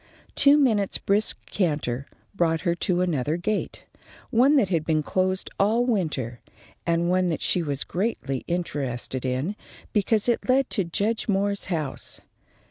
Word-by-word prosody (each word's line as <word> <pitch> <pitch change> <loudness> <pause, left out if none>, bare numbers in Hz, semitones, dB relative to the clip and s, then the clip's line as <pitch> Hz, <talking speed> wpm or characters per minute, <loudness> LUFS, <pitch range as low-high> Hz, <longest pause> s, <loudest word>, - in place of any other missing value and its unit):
Two 285 +1 +6
minutes' 220 -9 +2
brisk 205 +2 +1
canter 145 -8 -1 0.3
brought 165 -4 +1
her 170 -1 +1
to 175 +1 0
another 155 -3 0
gate, 205 +4 -2 0.5
one 260 +6 +5
that 220 -10 +3
had 165 -4 +1
been 155 -1 +1
closed 185 +3 0
all 225 +5 +3
winter, 150 - -1 0.5
and 170 0 +2
one 185 0 +2
that 165 -3 -2
she 180 - +2
was 140 -4 0
greatly 175 - -2
interested 135 -7 -3
in, 130 +10 -1 0.4
because 210 +1 +2
it 240 +1 0
led 265 0 +3
to 200 - +1
Judge 205 +6 -1
Moore's 200 0 0
house. 155 -7 -4
180 Hz, 145 wpm, -25 LUFS, 155-210 Hz, 0.5 s, Two